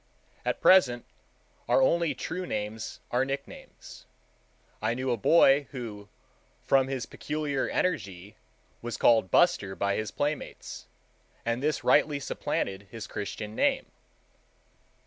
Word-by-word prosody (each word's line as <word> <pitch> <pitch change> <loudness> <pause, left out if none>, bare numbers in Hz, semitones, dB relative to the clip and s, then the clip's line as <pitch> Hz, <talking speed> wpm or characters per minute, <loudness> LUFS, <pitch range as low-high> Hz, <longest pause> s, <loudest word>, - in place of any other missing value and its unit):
At - - -2
present 125 -11 +5 0.6
our - - +4
only 165 +2 +2
true 180 +7 -4
names 105 +1 -4
are 125 +2 +2
nicknames. 135 +1 -8 0.7
I 110 +2 0
knew 130 0 -1
a - - +2
boy 140 +3 +5
who, 105 -6 -7 0.6
from 135 -1 +4
his 135 -2 -3
peculiar 150 -3 -3
energy, 100 - -2 0.5
was 120 -1 -4
called 110 -5 +4
"Buster" 140 - +3
by 100 0 0
his 110 -1 -2
playmates, 145 +5 -4 0.6
and 115 +1 -1
this 150 +1 0
rightly 150 -2 +3
supplanted 100 -6 -3
his 110 +1 -7
Christian 105 0 -5
name. - - +1
125 Hz, 120 wpm, -28 LUFS, 105-145 Hz, 0.7 s, present